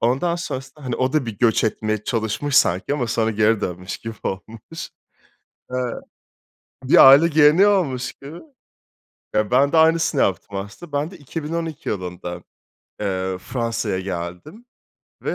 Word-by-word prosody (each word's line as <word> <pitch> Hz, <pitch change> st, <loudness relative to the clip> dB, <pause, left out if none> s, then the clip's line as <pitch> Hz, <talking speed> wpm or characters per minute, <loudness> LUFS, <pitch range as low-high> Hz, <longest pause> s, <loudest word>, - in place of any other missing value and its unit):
Ondan 135 Hz, +9 st, +1 dB
sonrasında, 135 Hz, -3 st, -7 dB
hani, 125 Hz, -, -2 dB
o 130 Hz, +1 st, 0 dB
da 150 Hz, -5 st, +1 dB
bir 110 Hz, -3 st, -6 dB
göç 115 Hz, -2 st, +3 dB
etmeye 110 Hz, -1 st, -2 dB
çalışmış 115 Hz, +5 st, -1 dB
sanki 95 Hz, +3 st, +3 dB
ama 125 Hz, -5 st, -1 dB
sonra 110 Hz, 0 st, 0 dB
geri 110 Hz, 0 st, +2 dB
dönmüş 90 Hz, 0 st, -5 dB
gibi 115 Hz, 0 st, -7 dB
olmuş. 115 Hz, -, -6 dB, 0.9 s
Eee -, -, 0 dB, 1.1 s
Bir 135 Hz, -, +7 dB
aile 145 Hz, +5 st, +7 dB
geleneği 155 Hz, +5 st, +5 dB
olmuş 140 Hz, -11 st, 0 dB
gibi. 145 Hz, +5 st, -11 dB, 1.0 s
Ya, 105 Hz, +1 st, +1 dB
ben 140 Hz, +3 st, +4 dB
de 165 Hz, -, +2 dB
aynısını 160 Hz, -2 st, +3 dB
yaptım 100 Hz, +1 st, -1 dB
aslında. 105 Hz, -, -8 dB
Ben 145 Hz, +4 st, -2 dB
de 185 Hz, -, -11 dB
2012 160 Hz, +2 st, -5 dB
yılında, 90 Hz, -2 st, -5 dB, 0.6 s
eee, 95 Hz, -2 st, -2 dB
Fransa'ya 115 Hz, -2 st, -2 dB
geldim 90 Hz, -, -6 dB, 0.6 s
ve, -, -, -2 dB
120 Hz, 140 wpm, -21 LUFS, 105-150 Hz, 1.1 s, Bir